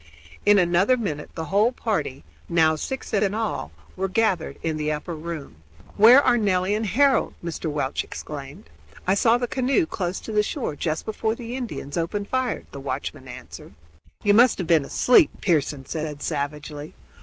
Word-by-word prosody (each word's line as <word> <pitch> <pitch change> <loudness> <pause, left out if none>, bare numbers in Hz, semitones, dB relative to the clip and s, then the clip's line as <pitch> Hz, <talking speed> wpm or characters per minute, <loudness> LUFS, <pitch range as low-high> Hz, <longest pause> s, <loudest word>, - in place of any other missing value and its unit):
In 205 0 +7
another 185 +7 +3
minute 155 -11 -4
the 160 - -4
whole 215 +4 +4
party, 210 - -3 0.3
now 160 -2 +4
six 265 - -5
in 200 -1 +1
all, 225 -1 -2 0.2
were 190 +1 -1
gathered 190 -4 0
in 160 -1 -1
the 150 0 -1
upper 155 +3 -4
room. 155 - -7 0.4
"Where 240 +7 +8
are 240 - +3
Nelly 190 -2 +1
and 215 +1 -1
Harold?" 275 +5 +3
Mr. 165 -1 -3
Welch 145 -2 -1
exclaimed. 140 - -9 0.3
"I 185 - +3
saw 225 +4 +4
the 245 - -1
canoe 265 +8 +1
close 185 - -3
to - - -7
the 210 -1 +3
shore 210 - -3
just 155 +1 -2
before 220 +1 -1
the 240 0 -6
Indians 230 - -5
opened 200 +5 -3
fire," 260 -2 -1
the 140 - -8
watchman 135 0 -5
answered. - - -11 0.5
"You 205 - +4
must 240 +3 +6
have 185 - -3
been 160 -4 +3
asleep," 245 - +5
Pearson 145 -6 0
said 150 -1 -5
savagely. 150 0 -4
185 Hz, 170 wpm, -24 LUFS, 155-225 Hz, 0.5 s, Where